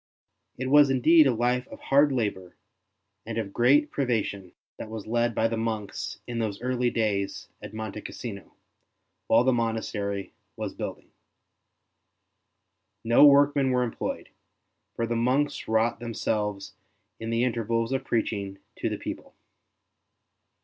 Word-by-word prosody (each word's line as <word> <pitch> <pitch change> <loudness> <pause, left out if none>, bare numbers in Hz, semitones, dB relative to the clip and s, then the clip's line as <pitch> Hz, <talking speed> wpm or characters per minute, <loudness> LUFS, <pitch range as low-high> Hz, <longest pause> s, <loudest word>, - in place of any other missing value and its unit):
It 130 +1 -3
was 145 -1 +7
indeed 150 +4 +5
a - - +4
life 125 +2 0
of - - -11
hard 140 +1 +3
labour 100 -8 -2 0.7
and 115 0 -5
of 100 -3 -3
great 145 +5 +4
privation 105 -8 -2 0.2
that 110 - -7
was 110 -2 -6
led 120 0 0
by 115 - +2
the 115 0 -3
monks 110 -2 -3
in 120 -1 -4
those 105 -3 -2
early 125 -1 0
days 105 -4 -2
at - - -8
Monte 110 -1 -5
Cassino, 105 -5 -8 0.7
while - - +5
the 130 0 +3
monastery 110 -4 -2 0.2
was - - -5
building. - - -7 1.9
No 115 +4 +5
workmen 140 -1 +5
were 125 -1 +2
employed, 115 - -4 0.7
for 115 - -1
the 120 +1 -2
monks 130 +5 0
wrought 110 +1 +1
them 115 -1 -6
selves 105 -2 -2 0.5
in 115 - -5
the 115 +1 +1
intervals 115 -1 0
of 135 - -1
preaching 100 -4 -2 0.2
to - - -1
the - - -3
people. - - -7
115 Hz, 140 wpm, -27 LUFS, 110-125 Hz, 1.9 s, was